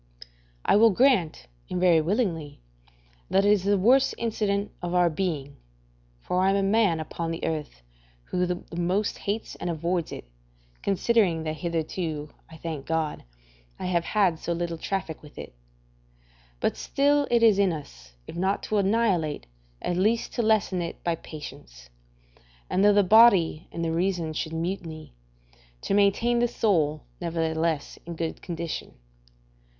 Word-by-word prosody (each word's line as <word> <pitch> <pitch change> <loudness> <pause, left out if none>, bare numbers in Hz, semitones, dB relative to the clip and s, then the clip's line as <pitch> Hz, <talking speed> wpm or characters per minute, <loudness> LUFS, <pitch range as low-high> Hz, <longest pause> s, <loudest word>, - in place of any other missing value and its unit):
I - - +5
will 225 +2 +7
grant, 200 - +2 0.2
and 180 - -2
very 175 -3 +5
willingly, 165 - -1 0.7
that 195 +1 +3
it 205 - +5
is 200 -3 +2
the 200 0 +3
worst 255 +8 +4
incident 210 -3 -1
of 175 0 -3
our 175 -1 +4
being 150 -5 -3 0.6
(for 180 - 0
I 190 - +4
am 195 - +2
the 200 - +1
man 200 -4 +3
upon 165 +1 -4
earth 150 - -4 0.4
who 180 - -1
the 180 0 -3
most 180 +5 0
hates 210 +2 -3
and 175 - -4
avoids 170 +1 -1
it, - - -7 0.6
considering 195 -4 +2
that 155 0 -3
hitherto, 160 -1 -3 0.2
I 160 - -12
thank 155 -4 -6
God, 160 - -2 0.5
I - - -6
have 175 -2 +1
had 190 -7 +2
so 170 - -2
little 170 -1 -3
traffic 185 -5 -3
with 150 - -15
it), - - -8 1.1
but - - 0
still 285 +1 +2
it 235 -1 +3
is 215 -3 +5
in 195 -2 +4
us, 140 - -9
if - - -9
not 190 +3 0
to 215 - 0
annihilate, 195 -7 +1 0.4
at 175 - -1
least 220 +5 +1
to - - 0
lessen 215 -5 +2
it 170 - -6
by 170 - +1
patience; - - -10 0.8
and 190 - +2
though 205 - +7
the 205 0 +4
body 195 -6 +5
and 170 0 -3
the 165 - -1
reason 170 -2 -1
should 160 +1 -3
mutiny, 165 - -4 0.7
to - - -2
maintain 205 +4 +3
the 240 - +3
soul, 160 -11 +1 0.2
nevertheless, 165 -2 -1
in 170 - -5
good 165 0 -4
condition. 170 -2 -5
175 Hz, 155 wpm, -26 LUFS, 160-200 Hz, 1.1 s, will